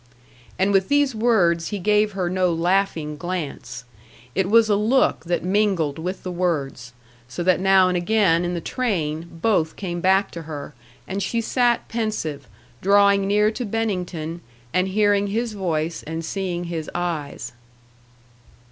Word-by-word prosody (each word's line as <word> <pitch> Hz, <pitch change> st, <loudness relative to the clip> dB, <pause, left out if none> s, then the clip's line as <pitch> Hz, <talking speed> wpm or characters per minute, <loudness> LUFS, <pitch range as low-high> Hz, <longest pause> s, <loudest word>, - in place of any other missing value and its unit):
And 190 Hz, +2 st, +2 dB
with 190 Hz, -1 st, +2 dB
these 285 Hz, -2 st, +3 dB
words 190 Hz, -8 st, +2 dB
he 205 Hz, -, -3 dB
gave 210 Hz, +2 st, +2 dB
her 185 Hz, -2 st, -1 dB
no 185 Hz, 0 st, +1 dB
laughing 165 Hz, -3 st, 0 dB
glance. 165 Hz, -8 st, -5 dB, 0.5 s
It 190 Hz, 0 st, 0 dB
was 225 Hz, +1 st, +5 dB
a 210 Hz, -, +3 dB
look 215 Hz, -4 st, +2 dB
that 175 Hz, +1 st, -1 dB
mingled 185 Hz, -6 st, +1 dB
with 180 Hz, +4 st, -4 dB
the 185 Hz, -, -4 dB
words; 140 Hz, -9 st, -2 dB, 0.3 s
so 125 Hz, +8 st, -4 dB
that 185 Hz, 0 st, +3 dB
now 190 Hz, 0 st, +5 dB
and 180 Hz, -, 0 dB
again 180 Hz, -2 st, +2 dB
in 175 Hz, 0 st, -2 dB
the 170 Hz, -, -3 dB
train, 165 Hz, -9 st, -2 dB
both 165 Hz, -2 st, 0 dB
came 175 Hz, -3 st, -4 dB
back 190 Hz, +2 st, +3 dB
to 170 Hz, -, -7 dB
her, 150 Hz, -2 st, -7 dB, 0.3 s
and 195 Hz, +1 st, -3 dB
she 230 Hz, +4 st, -1 dB
sat 240 Hz, +1 st, +1 dB
pensive, 160 Hz, -, -3 dB, 0.3 s
drawing 200 Hz, 0 st, +4 dB
near 210 Hz, +1 st, +3 dB
to 245 Hz, -, -4 dB
Bennington 180 Hz, -7 st, -3 dB, 0.3 s
and 185 Hz, +1 st, +2 dB
hearing 205 Hz, 0 st, +2 dB
his 225 Hz, +3 st, -2 dB
voice 170 Hz, -5 st, -2 dB
and 160 Hz, +1 st, -5 dB
seeing 180 Hz, -1 st, -3 dB
his 165 Hz, -3 st, -4 dB
eyes. 155 Hz, -8 st, -3 dB
185 Hz, 155 wpm, -22 LUFS, 165-205 Hz, 0.5 s, was